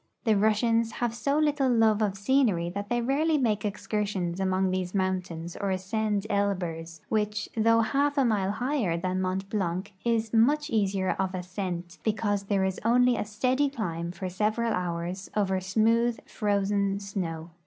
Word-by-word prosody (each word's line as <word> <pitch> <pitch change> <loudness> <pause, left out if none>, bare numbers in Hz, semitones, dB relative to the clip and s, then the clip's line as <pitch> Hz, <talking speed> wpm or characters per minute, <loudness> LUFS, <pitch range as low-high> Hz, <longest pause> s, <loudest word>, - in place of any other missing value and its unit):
The 220 -4 +3
Russians 225 +2 +2
have 240 -2 -1
so 280 +5 0
little 295 -3 +2
love 225 -3 +3
of 205 -3 +1
sceneiy 200 -5 +1
that 200 +1 -5
they 240 0 +1
rarely 300 +6 +2
make 220 -6 +1
excursions 205 -3 -2
among 190 0 +1
these 185 0 -2
mountains 180 -3 -2
or 200 - -2
ascend 200 +2 -1
Elburz, 175 -6 -2
which, 210 0 -1
though 230 +1 +4
half 285 +6 +1
a 275 - +4
mile 205 -5 +1
higher 240 - 0
than 185 +2 -1
Mont 185 +1 -2
Blanc, 190 0 -2
is 230 -2 0
much 290 +7 +3
easier 195 -3 +1
of 190 -1 -1
ascent, 180 -1 -5
because 205 -2 0
there 195 -1 +1
is 190 0 -2
only 245 +2 +4
a - - -2
steady 255 +7 +1
climb 170 - -3
for 185 +1 -5
several 215 +5 0
hours 180 +1 -3
over 190 -3 +1
smooth, 225 +5 +2
frozen 200 -1 0
snow. 175 -5 -5
205 Hz, 160 wpm, -27 LUFS, 185-230 Hz, -, though